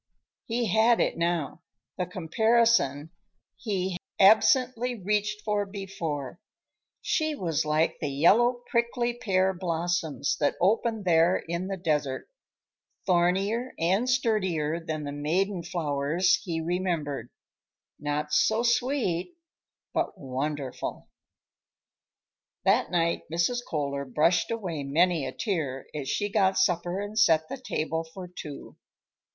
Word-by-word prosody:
He 235 +1 -1
had 225 +2 +5
it - - +1
now, 170 -2 -1 0.3
the 180 - -2
comparison 180 - +2 0.4
he 190 -4 -2
had 175 - -5 0.3
absently 250 +2 +2
reached 210 +2 -1
for 210 -1 0
before: 175 -8 -5 0.6
she 310 -2 0
was 165 - -1
like 155 +2 +1
the 150 - -1
yellow 235 - +3
prickly 235 0 +1
pear 190 -5 +1
blossoms 170 -4 -1
that 145 - +1
open 220 +3 +1
there 170 0 +4
in 170 +2 -3
the 195 -1 -3
desert; 150 -6 -1 0.8
thornier 195 +7 +1
and 190 +9 +1
sturdier 190 -11 +1
than 155 -2 -4
the 145 - -4
maiden 175 +6 -1
flowers 160 +1 +1
he 170 -4 -3
remembered; 165 -4 -2 0.7
not 150 +1 -2
so 220 +2 +3
sweet, 240 - 0 0.6
but - - -1
wonderful. 135 0 -4 1.6
That - - +3
night 170 -3 0
Mrs. 170 +9 +1
Kohler 140 -2 -2
brushed 155 +6 +2
away 185 -10 -3
many 155 +1 +2
a - - -4
tear 145 - -3
as 145 -3 -4
she 205 - 0
got 195 -2 +2
supper 180 -1 +1
and 205 +2 -3
set 160 -6 +4
the - - -4
table 160 -3 -2
for 180 +3 -9
two. 155 -5 -9
175 Hz, 120 wpm, -27 LUFS, 155-210 Hz, 1.6 s, had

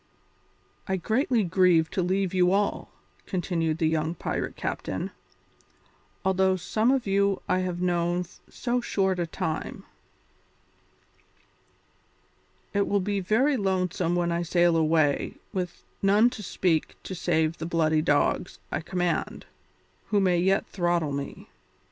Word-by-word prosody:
"I 190 - 0
greatly 230 - +1
grieve 175 -2 +3
to 185 - 0
leave 190 +1 0
you 180 -1 +3
all," 200 +1 0 0.4
continued 165 -4 -1
the 165 -2 +1
young 160 +1 0
pirate - - -3
captain, - - -4 1.1
"although 190 0 +3
some 215 +6 0
of 265 -2 +2
you 200 0 +1
I 185 - +2
have 180 -1 -2
known 175 0 0 0.2
so 245 0 -1
short 190 -5 0
a 170 - -1
time. 160 -1 -4 2.9
It 200 -1 +1
will 200 - +2
be 200 +1 -1
very 235 +10 +2
lonely 190 -4 0 0.2
when 175 -1 +1
I 170 0 0
sail 175 0 +3
away 155 -2 +2 0.2
with 180 -3 -4 0.2
none 210 +5 +4
to 220 - -7
speak 175 -4 0
to - - -6
save 165 -2 0
the 165 - -4
bloody 160 -2 +2
dogs 145 -2 +1
I - - -1
command, 175 -1 -2 0.6
who 210 - +2
may 180 -3 +3
yet 190 +2 +2
throttle 175 -4 0
me. 140 0 -5
180 Hz, 130 wpm, -26 LUFS, 170-195 Hz, 2.9 s, none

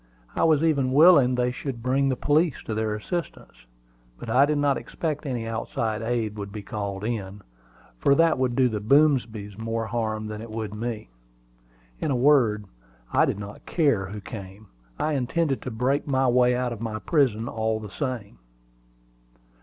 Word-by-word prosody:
I - - +1
was 155 -2 +4
even 140 -5 +2
willing 145 -5 +6
they 125 0 +1
should 125 -2 -6
bring 135 +2 +2
the 130 - +1
police 150 +3 +1
to 110 - -4
their 110 0 -1
assistance. 140 - -6 0.5
But 115 - -6
I 135 +4 +5
did 150 0 +1
not 145 -1 +2
expect 155 -2 -4
any 120 -4 -3
outside 110 -1 -2
aid 115 -2 -2
would 100 0 -6
be 105 -1 -7
called 100 -1 -5
in, 105 -3 -4 0.6
for 140 - +4
that 165 -2 +3
would 125 -2 0
do 130 0 +4
the 110 -3 -2
Boomsbys 110 -5 +2
more 115 0 -2
harm 110 -2 -2
than 105 0 -6
it 115 - -9
would 110 -2 -5
me. 110 - -5 0.9
In - - -2
a 135 - +1
word, 120 -6 +3 0.5
I - - +5
did - - -2
not 100 0 -9
care 140 - +1
who 105 +2 -7
came: 100 +1 -9 0.3
I 155 - 0
intended 140 +2 0
to - - -5
break 125 +6 0
my 135 -1 +2
way 125 0 +4
out 125 -1 -1
of 115 - -9
my 110 -2 -3
prison, 120 -3 +1
all 110 -1 -1
the 105 -2 -9
same. 120 - -5
120 Hz, 175 wpm, -25 LUFS, 110-135 Hz, 0.9 s, willing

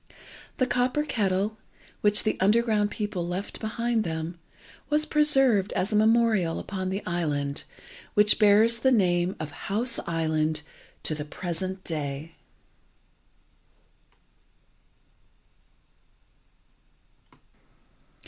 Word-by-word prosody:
The 255 - +2
copper 250 +3 0
kettle, 205 -4 -1 0.4
which 210 0 +5
the 215 - 0
underground 210 +1 +2
people 205 -5 -4
left 180 +3 -4
behind 230 +1 -1
them, 165 0 -5 0.5
was 305 0 +1
preserved 270 -10 +3
as 195 +4 -1
a - - +2
memorial 215 -5 +3
upon 185 -1 -4
the 195 +2 -4
island, 145 -5 -2 0.5
which 210 0 +5
bears 220 +2 +5
the 260 +2 +3
name 180 -5 +2
of 155 -1 -5
House 230 - -2
Island 155 -2 0 0.4
to - - -3
the 150 -1 -4
present 185 +4 -5
day. 150 0 -5
200 Hz, 95 wpm, -26 LUFS, 170-225 Hz, 0.5 s, which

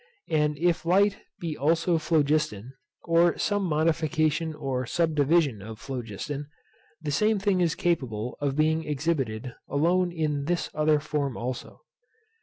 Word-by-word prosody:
And 150 -1 +2
if 170 +2 +1
light 195 +4 +3 0.2
be 165 -3 -3
also 165 +3 +2
phlogiston, 150 -7 0 0.3
or 170 0 +3
some 205 -1 0
modification 155 -1 +1
or 130 -3 -2
subdivision 150 -6 +2
of 110 +2 -8
phlogiston, 135 +4 -5 0.6
the 150 - -2
same 215 +9 +2
thing 195 -2 +1
is 170 -2 +2
capable 125 -9 -1
of 140 -2 0
being 160 +1 +2
exhibited 135 -6 -2 0.2
alone 175 +5 +2
in 150 -4 -1
this 175 +2 -1
other 155 0 +3
form 145 -3 -2
also. 125 +1 -5
155 Hz, 130 wpm, -27 LUFS, 140-170 Hz, 0.6 s, light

